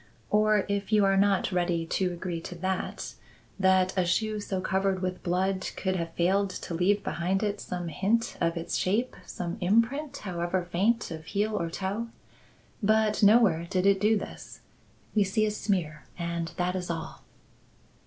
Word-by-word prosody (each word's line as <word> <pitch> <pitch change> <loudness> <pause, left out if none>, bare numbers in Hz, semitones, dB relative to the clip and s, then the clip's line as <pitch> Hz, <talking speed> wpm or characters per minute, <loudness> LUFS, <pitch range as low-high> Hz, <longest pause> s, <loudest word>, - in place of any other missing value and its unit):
Or, 215 -1 +3
if 200 0 -2
you 210 -2 +5
are 195 0 +3
not 195 0 +3
ready 175 -2 0
to 180 +2 0
agree 175 -1 -4
to 180 - -7
that, 185 +2 -3 0.5
that 190 -1 +3
a 185 - +3
shoe 215 +4 0
so 195 -2 -3
covered 190 0 0
with 185 0 -2
blood 185 +2 0
could 190 -1 -1
have 165 -2 -3
failed 195 +3 +2
to 185 - -6
leave 200 +4 +2
behind 185 +5 -1
it 205 -1 -1
some 175 -1 -4
hint 210 +9 0
of 170 0 +1
its 165 - -3
shape, 220 +7 0
some 175 -1 -5
imprint, 230 +10 +1
however 175 -1 -2
faint, 200 +5 +1
of 160 -1 -7
heel 210 +3 -1
or 170 -5 -1
toe? 200 +6 -3 0.7
But 215 0 +2
nowhere 200 -6 +5
did 185 -1 0
it 200 -1 +4
do 215 +1 +4
this. - - -8 0.5
We 210 - +4
see 205 +3 +1
a 215 - 0
smear 170 -9 -2
and 170 -1 -3
that 180 +1 0
is 180 -1 -3
all." 165 -1 -5
190 Hz, 170 wpm, -28 LUFS, 175-205 Hz, 0.7 s, you